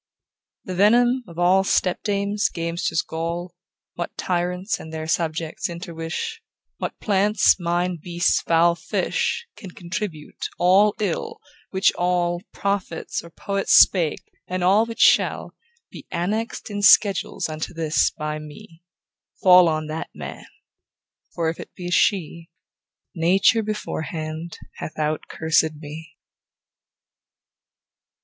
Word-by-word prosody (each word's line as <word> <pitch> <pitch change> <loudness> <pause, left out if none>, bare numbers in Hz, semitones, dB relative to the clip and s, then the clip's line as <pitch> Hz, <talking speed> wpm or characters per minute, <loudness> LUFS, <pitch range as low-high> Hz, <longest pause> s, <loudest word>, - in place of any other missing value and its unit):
The 185 - -5
venom 240 +6 +4
of 170 -1 -13
all 180 +2 +4
stepdames, 200 +2 0
gamesters' 165 -1 -1
gall, 170 +2 -4 0.4
What 175 - -6
tyrants 180 +3 -1
and 160 - -10
their 160 0 -5
subjects 165 +4 -2
interwish, 170 - -5 0.4
What - - -5
plants, 205 -1 +3
mine, 175 0 -1
beasts, 175 0 +1
fowl, 170 +1 +3
fish, 170 - -2
Can 195 - -10
contribute, 175 -3 -6
all 195 +4 +4
ill, 445 - -2 0.3
which 190 +1 +2
all 175 -1 0
Prophets 200 -4 -3
or 170 - -12
poets 195 +3 -1
spake, 170 -5 +5 0.2
and 185 0 -2
all 205 +5 +4
which 230 0 -5
shall - - +3 0.4
Be - - -11
annex'd 210 +6 -3
in 205 0 -3
schedules 200 -2 +4
unto 155 0 -5
this 165 -2 +1
by 150 0 -5
me, 155 +2 -13 0.6
Fall 180 -2 +8
on 155 0 -1
that 155 +1 -5
man; - - -8 0.9
For 165 -1 0
if 160 - -3
it - - -10
be 175 -1 -6
a - - -6
she 170 -4 +1 0.6
Nature 185 +7 +3
beforehand 160 -6 -5 0.2
hath - - -7
out 155 0 -1
cursèd 160 -1 +1
me. 155 +1 -10
175 Hz, 120 wpm, -23 LUFS, 165-200 Hz, 0.9 s, Fall